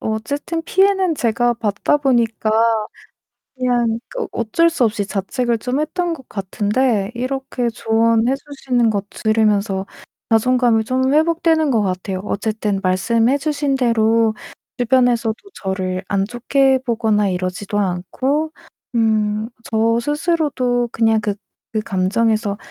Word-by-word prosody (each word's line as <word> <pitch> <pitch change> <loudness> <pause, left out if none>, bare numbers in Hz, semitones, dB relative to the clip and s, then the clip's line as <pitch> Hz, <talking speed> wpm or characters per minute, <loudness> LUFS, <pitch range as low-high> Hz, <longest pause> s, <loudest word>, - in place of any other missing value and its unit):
어쨌든 285 +9 -3
피해는 380 -1 +2
제가 240 -1 +1
받다 215 +5 0
보니까 235 -6 +1 1.0
그냥 240 -3 0 0.2
어 - - -1
어쩔 235 +9 +2
수 305 -6 +1
없이 210 -3 0
자책을 230 +4 -1
좀 250 +5 -2
했던 340 +3 -1
것 265 -6 -14
같은데 205 +2 0
이렇게 255 0 -2
조언해 230 +2 +2
주시는 265 -4 -1
거 200 -2 -1
들으면서 210 -3 +1 0.4
자존감이 235 0 +3
좀 260 +3 +1
회복되는 320 -1 +2
것 225 -4 +2
같아요. 185 0 -3
어쨌든 210 -1 -2
말씀해 225 +8 +2
주신 285 -1 -1
대로 230 -2 +2 0.4
주변에서도 245 -2 +2 0.3
저를 185 -1 -2
안 195 -1 +1
좋게 265 +3 +2
보거나 220 -4 +1
이러지도 185 +2 -3
않고 255 - -1 0.4
음 215 -1 +1 0.2
저 230 +1 +2
스스로도 290 -4 0
그냥 225 -1 +2
그 205 -1 -2 0.4
그 220 - 0
감정에서 210 +2 0
230 Hz, 265 characters per minute, -19 LUFS, 210-265 Hz, 1.0 s, 자존감이